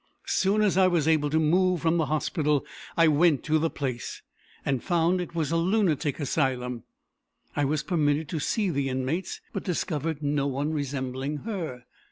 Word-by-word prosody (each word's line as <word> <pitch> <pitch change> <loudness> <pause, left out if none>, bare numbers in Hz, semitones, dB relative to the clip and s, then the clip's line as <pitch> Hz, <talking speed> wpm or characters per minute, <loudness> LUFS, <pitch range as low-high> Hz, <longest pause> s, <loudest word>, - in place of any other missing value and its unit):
As - - -4
soon 205 +3 +2
as 200 -3 +2
I 185 - +6
was 170 -4 +1
able 155 -2 +3
to 155 - +1
move 180 +2 +3
from 165 +1 +2
the 160 -3 +1
hospital, 150 -1 0 0.3
I 165 -1 +6
went 155 -2 +4
to 155 +1 +2
the 165 +1 +1
place, 130 -6 -4 0.4
and 135 -3 0
found 175 0 +2
it 170 -1 -7
was 160 -2 -1
a 165 - +2
lunatic 170 -6 +1
asylum. 125 -5 -1 0.7
I 145 - +1
was 150 +2 0
permitted 150 -3 +1
to 165 - -2
see 200 +5 0
the 140 -2 -1
inmates, 130 +8 -2
but 195 - -3
discovered 160 -4 -2
no 145 -1 +1
one 140 +3 -1
resembling 140 0 -3
her. 165 - -4
155 Hz, 180 wpm, -27 LUFS, 140-170 Hz, 0.7 s, I